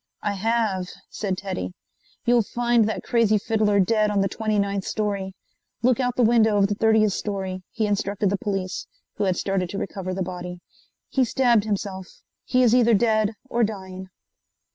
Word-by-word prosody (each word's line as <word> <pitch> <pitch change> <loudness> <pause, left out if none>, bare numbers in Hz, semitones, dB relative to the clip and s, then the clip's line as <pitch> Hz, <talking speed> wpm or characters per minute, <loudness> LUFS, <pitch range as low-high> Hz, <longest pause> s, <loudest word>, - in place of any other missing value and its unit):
"I 205 - 0
have," 205 -2 0 0.2
said 195 -3 -2
Teddy. 140 - -4 0.5
"You'll 240 0 +4
find 235 0 +1
that - - -4
crazy 225 -3 +3
fiddler 210 -1 +1
dead 215 +2 +3
on 205 -1 +1
the 195 - +2
twenty 215 +2 -1
ninth 200 -1 0
story. 200 -3 -2 0.5
Look 250 0 +3
out 250 -1 0
the 250 - +2
window 220 -2 +4
of 200 - +4
the 205 - 0
thirtieth 215 -1 +3
story," 190 -3 -3
he 225 -2 -1
instructed 200 -1 0
the 200 - +1
police, 195 -2 -3 0.3
who 210 - 0
had 185 -2 +1
started 195 -2 -1
to 200 - -5
recover 190 -2 -4
the 190 - -1
body. 180 0 -6 0.5
"He 265 - +2
stabbed 240 -3 +3
himself. 195 -3 -5 0.2
He 255 0 +3
is 235 -2 +4
either 235 -2 +5
dead 215 0 +2
or 240 -2 +1
dying." 190 -3 -5
205 Hz, 175 wpm, -24 LUFS, 195-225 Hz, 0.5 s, either